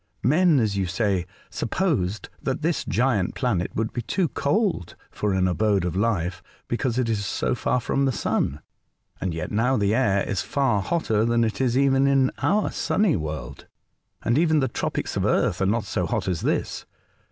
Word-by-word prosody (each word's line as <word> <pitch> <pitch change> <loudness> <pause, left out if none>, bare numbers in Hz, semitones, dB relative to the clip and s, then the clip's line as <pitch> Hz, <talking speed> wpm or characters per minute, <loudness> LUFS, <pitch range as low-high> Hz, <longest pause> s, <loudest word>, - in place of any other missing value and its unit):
Men, 155 - +4
as 110 -4 0
you 95 -2 0
say, 95 -2 0 0.2
supposed 115 - -1
that 135 +3 -2
this 165 0 0
giant 115 -6 0
planet 100 -9 0
would 110 0 -1
be 120 - -2
too 175 - 0
cold 185 - 0 0.2
for 105 - -1
an 95 -1 +2
abode 100 0 +1
of 90 - -2
life 95 -4 0 0.3
because 120 0 -1
it 125 -2 +1
is 110 -2 -1
so 100 - -1
far 125 +1 0
from 135 +3 0
the 135 - +2
Sun, 75 - -1 0.6
and 95 - -1
yet 80 0 -4
now 125 +5 +2
the 100 -1 +2
air 105 -5 +2
is 100 - -1
far 135 -8 +1
hotter 110 - 0
than 115 0 +2
it 110 +3 -1
is 125 -1 +2
even 135 0 +3
in 135 -2 +3
our 210 +2 +2
own - - -2
sunny 205 -3 +1
world, 75 - -5 0.6
and 120 +5 +2
even 160 -2 +3
the 135 - +1
tropics - - -3
of - - 0
Earth - - +1
are 95 - +2
never 105 +1 0
so - - -1
hot - - -2
as 90 -4 -1
this. - - -2
115 Hz, 190 wpm, -24 LUFS, 95-135 Hz, 0.6 s, Men